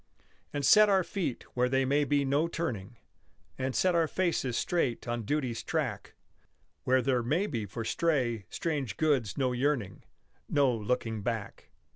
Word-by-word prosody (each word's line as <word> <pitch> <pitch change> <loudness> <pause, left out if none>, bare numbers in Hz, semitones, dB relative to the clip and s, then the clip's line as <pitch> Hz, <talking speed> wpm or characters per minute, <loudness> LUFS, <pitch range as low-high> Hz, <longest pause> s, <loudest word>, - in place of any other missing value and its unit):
And 145 -1 -2
set 210 +7 +7
our 190 -2 +4
feet 170 - -3
where 125 0 +1
there 135 +1 +2
may 145 +2 +2
be 145 -1 +1
no 145 +4 +2
turning, 120 - -4 0.6
And 130 0 -3
set 185 -1 +3
our 165 -1 +3
faces 160 -9 0
straight 135 -10 -1
on 120 -1 -2
duty's 130 -3 -1
track, - - -3 0.7
Where 130 0 +3
there 130 -3 +2
may 155 - +1
be 115 - -3
for 115 +4 -5
stray, 120 - 0
strange 145 -9 -3
goods 135 - +1
no 130 -2 +1
yearning 125 - -1 0.5
Nor 130 -6 +2
looking 115 -1 -1
back. 115 -1 -4
130 Hz, 155 wpm, -30 LUFS, 120-150 Hz, 0.7 s, set